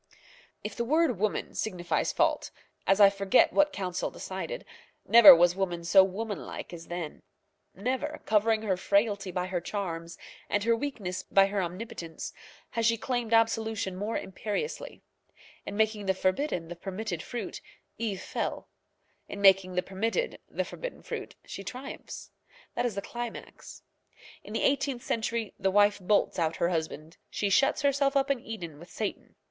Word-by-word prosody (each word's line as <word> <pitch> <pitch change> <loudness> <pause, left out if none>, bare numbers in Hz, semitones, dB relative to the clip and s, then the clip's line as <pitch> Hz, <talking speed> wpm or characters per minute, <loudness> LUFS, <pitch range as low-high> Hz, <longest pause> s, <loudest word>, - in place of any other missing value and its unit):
If 210 -1 -5
the 235 - -1
word 310 - +2
woman 215 0 -1
signifies 180 -5 -1
fault, - - +1 0.4
as 195 +1 +4
I 200 -1 +8
forget 195 +3 +3
what 295 0 +4
Council 185 -7 -3
decided, - - -6 0.4
never 230 -5 +11
was 175 +1 +4
woman 175 -3 -2
so 190 +3 +7
womanlike 200 0 -5
as 165 -1 -9
then. 175 -3 -5 0.5
Never, 260 +9 -2
covering 220 +1 +2
her 195 -4 +1
frailty 200 0 +1
by 180 0 -2
her 185 -2 -2
charms, 170 -3 -4 0.3
and 205 - +1
her 230 +1 +3
weakness 225 -9 -4
by 195 0 +4
her 195 0 -1
omnipotence, 180 -2 -6 0.4
has 230 -1 +1
she 230 0 +3
claimed 240 -1 -2
absolution 225 -3 +2
more 205 +4 -2
imperiously. 210 - -4 0.6
In 200 - -4
making 215 -2 +1
the 190 - +2
forbidden 185 - 0
the 175 - -7
permitted 190 0 -4
fruit, 245 - -6 0.4
Eve 210 -5 -2
fell; - - -3 0.6
in 200 - -6
making 190 -2 +5
the 180 - +1
permitted 225 - -2
the - - -2
forbidden - - -7
fruit, - - -6
she 195 - -7
triumphs. 255 +8 -8 0.4
That 245 - 0
is 225 - -5
the 200 - -3
climax. 240 -1 -7 0.6
In - - -9
the - - -1
eighteenth 270 -2 +1
century 230 -2 -2
the 190 - +2
wife 205 +1 +4
bolts 200 0 +1
out 165 -1 +1
her 170 - +1
husband. 160 -1 -4
She 200 -1 -1
shuts 275 +8 +3
herself 280 0 +3
up 275 0 +2
in 275 - 0
Eden 175 -11 -7
with 170 - -13
Satan. 215 -2 -5
205 Hz, 160 wpm, -29 LUFS, 185-230 Hz, 0.6 s, never